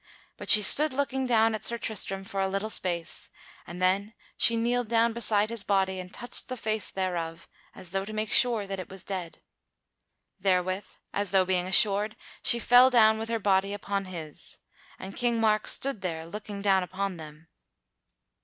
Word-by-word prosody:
But - - -7
she 210 - +9
stood 300 +7 +5
looking 265 -1 -2
down 225 -2 +3
at 215 -1 -5
Sir 235 - +2
Tristram 195 -4 -2
for 195 -1 -4
a 190 - +1
little 195 +3 -3
space, 170 -4 -2 0.4
and 175 +1 -9
then 195 +4 0 0.2
she 230 - +4
kneeled 240 +1 0
down 230 +1 +2
beside 215 -2 +1
his 230 -3 -1
body 190 -2 0
and 180 0 -9
touched 245 - -5
the 255 - -4
face 215 -2 0
thereof 170 -3 -4 0.3
as 175 - -8
though 195 0 -2
to 210 - -8
make 215 0 -3
sure 235 -5 +4
that 195 -1 -6
it 185 - -8
was 190 -1 -7
dead. 185 -4 -7 1.0
Therewith, 185 0 0 0.3
as 205 -1 -1
though 190 -1 +3
being 180 -1 -1
assured, 205 +3 +4 0.3
she 235 - +4
fell 245 +2 +5
down 220 -3 +4
with 225 +1 -5
her 230 - 0
body 195 -1 0
upon 200 -1 -4
his; 165 -5 -8 0.4
and 190 +1 -9
King 240 -2 0
Mark 215 -1 +1
stood 270 -7 0
there 165 -3 -4
looking 205 +2 -8
down 195 -2 +3
upon 185 +1 -4
them. 155 0 -12
200 Hz, 180 wpm, -27 LUFS, 185-225 Hz, 1.0 s, she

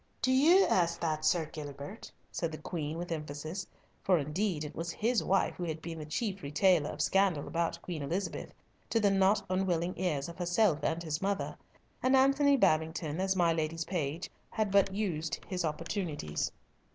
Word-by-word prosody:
"Do 255 - +2
you 330 +9 +6
ask 170 -2 +2
that, 155 -2 -1
Sir 165 0 +3
Gilbert?" 145 +5 -8 0.2
said 165 -2 -2
the 155 - -6
Queen 155 -1 -4
with 175 0 -5
emphasis, 155 +4 -4 0.3
for 185 -2 +3
indeed 155 +3 -1
it 150 0 -6
was 165 +1 -3
his 230 +6 +1
wife 195 - +2
who 180 - -6
had 160 -1 -3
been 165 0 -6
the 150 - -7
chief 195 +4 -2
retailer 150 +1 +3
of - - -2
scandal 195 -7 +2
about 170 0 -1
Queen 170 -4 -4
Elizabeth, 175 +8 -3 0.4
to 230 - +2
the 205 -2 +3
not 195 +1 +3
unwilling 185 -2 0
ears 150 -7 0
of 170 +1 -10
herself 175 -1 +2
and 165 +1 -1
his 155 -2 -2
mother; 195 0 -1 0.5
and 260 +1 +4
Antony 275 +1 +5
Babington, 160 - +1
as 190 0 +1
my 170 -2 +3
lady's 165 +1 -2
page, 165 -2 -2 0.2
had 215 -3 -1
but 200 -1 +4
used 165 -7 -2
his 185 -2 -2
opportunities. 155 - -2
170 Hz, 175 wpm, -31 LUFS, 155-195 Hz, 0.5 s, you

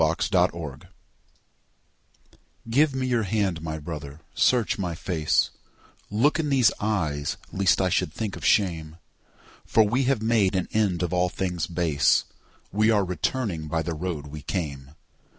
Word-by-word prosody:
To 80 +4 +2
My 90 -1 +5
Brother 75 -5 -8 1.8
GIVE 140 +3 +3
me 130 -1 -1
your 120 -2 +1
hand, 100 -5 -1
my 80 -1 -4
brother, 75 -1 -7
search 120 -4 +2
my 90 -3 -2
face; 80 -3 0 0.6
Look 130 +11 +2
in 150 -2 0
these 130 -5 +4
eyes 80 -9 -1 0.2
lest 95 -1 +3
I 95 -1 +2
should 80 - 0
think 105 +3 -4
of - - -10
shame; 80 -6 +1 0.7
For 110 - +4
we 120 +6 +1
have 135 -2 +2
made 110 -4 +2
an 95 - 0
end 95 -5 +1
of 90 0 -2
all 90 0 +2
things 90 -3 -2
base. 85 -5 +2 0.5
We 110 +3 +3
are 105 -3 +3
returning 90 -2 -2
by 80 +1 -1
the 85 - -3
road 80 -2 -4
we 75 +1 -8
came. 70 -6 -4
90 Hz, 155 wpm, -25 LUFS, 80-110 Hz, 1.8 s, My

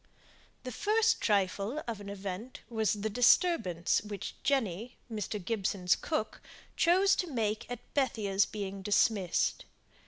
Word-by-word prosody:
The 255 - -5
first 435 - +2
"trifle" 205 +6 0
of 225 -3 -4
an 200 - -8
event 200 +4 -6
was 220 -1 +1
the 210 0 -2
disturbance 240 - +3
which 205 -2 -6
Jenny 245 -5 -1 0.2
(Mr. 210 0 -3
Gibson's 190 -2 0
cook) 220 -9 -3 0.3
chose 375 +3 +4
to 360 - -1
make 220 -4 -1
at 245 -1 -5
Bethia's 210 -8 +1
being 200 -2 -5
dismissed. 200 -2 +1
215 Hz, 125 wpm, -31 LUFS, 195-255 Hz, 0.3 s, chose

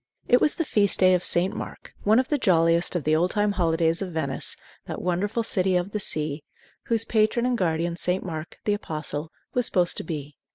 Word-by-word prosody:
It 245 - +4
was 300 - +3
the 330 - -1
Feast 205 -7 +4
Day 185 0 +5
of 180 -1 +1
St. 180 +2 +2
Mark, - - -8
one 215 +2 +3
of 260 0 +1
the 295 - +1
jolliest 170 -3 +2
of 175 - -1
the 155 +2 +2
old 175 +3 +2
time 205 0 +1
holidays 165 -2 +1
of 190 -2 -4
Venice, 150 -5 -2 0.3
that - - -5
wonderful 200 +6 -1
City 190 -4 +1
of 180 +2 -1
the 210 - -2
Sea, 150 -5 -2 0.4
whose 225 -1 0
patron 220 +2 +1
and 250 0 +1
guardian 170 -3 -1
St. 180 +2 -1
Mark, 160 -2 -6
the 210 - +2
apostle, 155 -4 -4 0.2
was 245 -2 +2
supposed 175 -2 +1
to - - -4
be. 150 -3 -6
180 Hz, 210 wpm, -25 LUFS, 165-210 Hz, 0.4 s, Day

